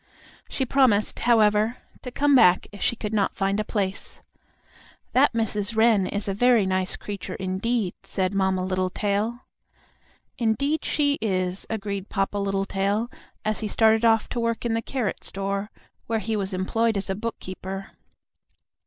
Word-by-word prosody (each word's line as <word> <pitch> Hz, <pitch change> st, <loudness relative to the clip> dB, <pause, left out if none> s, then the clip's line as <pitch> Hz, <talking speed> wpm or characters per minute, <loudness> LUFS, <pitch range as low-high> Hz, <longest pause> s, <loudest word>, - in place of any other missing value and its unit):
She 265 Hz, -, -1 dB
promised, 245 Hz, -6 st, +2 dB
however, 220 Hz, -1 st, +3 dB, 0.2 s
to 250 Hz, -, -6 dB
come 285 Hz, +3 st, +2 dB
back 180 Hz, -9 st, +6 dB
if 205 Hz, -, -11 dB
she -, -, +1 dB
could 215 Hz, -1 st, -5 dB
not 205 Hz, -3 st, +1 dB
find 195 Hz, +1 st, 0 dB
a -, -, +1 dB
place. 200 Hz, -3 st, -3 dB, 0.9 s
"That -, -, +5 dB
Mrs. 220 Hz, -1 st, -1 dB
Wren 220 Hz, -4 st, +4 dB
is 205 Hz, 0 st, -2 dB
a 195 Hz, -, 0 dB
very 235 Hz, 0 st, +4 dB
nice 185 Hz, 0 st, 0 dB
creature 205 Hz, -2 st, -6 dB
indeed," 190 Hz, +2 st, -1 dB
said 185 Hz, 0 st, -2 dB
Mamma 190 Hz, -1 st, +1 dB
Littletail. 200 Hz, +5 st, -1 dB, 1.0 s
"Indeed 280 Hz, +7 st, +1 dB
she 285 Hz, -1 st, +1 dB
is," 185 Hz, -3 st, -1 dB
agreed 200 Hz, -2 st, -4 dB
Papa 195 Hz, 0 st, -1 dB
Littletail, 200 Hz, +3 st, -1 dB, 0.3 s
as 215 Hz, 0 st, 0 dB
he 215 Hz, -, -2 dB
started 220 Hz, +1 st, +3 dB
off 225 Hz, -1 st, +4 dB
to 240 Hz, -, -3 dB
work 230 Hz, 0 st, -1 dB
in 235 Hz, -, +1 dB
the 225 Hz, -, 0 dB
carrot 245 Hz, -4 st, -3 dB
store, 195 Hz, +1 st, -3 dB, 0.4 s
where 230 Hz, -, 0 dB
he 220 Hz, +1 st, -2 dB
was 195 Hz, -1 st, -2 dB
employed 220 Hz, +4 st, 0 dB
as 195 Hz, -, -3 dB
a 195 Hz, -, -1 dB
bookkeeper. 195 Hz, -2 st, -6 dB
210 Hz, 155 wpm, -25 LUFS, 195-230 Hz, 1.0 s, back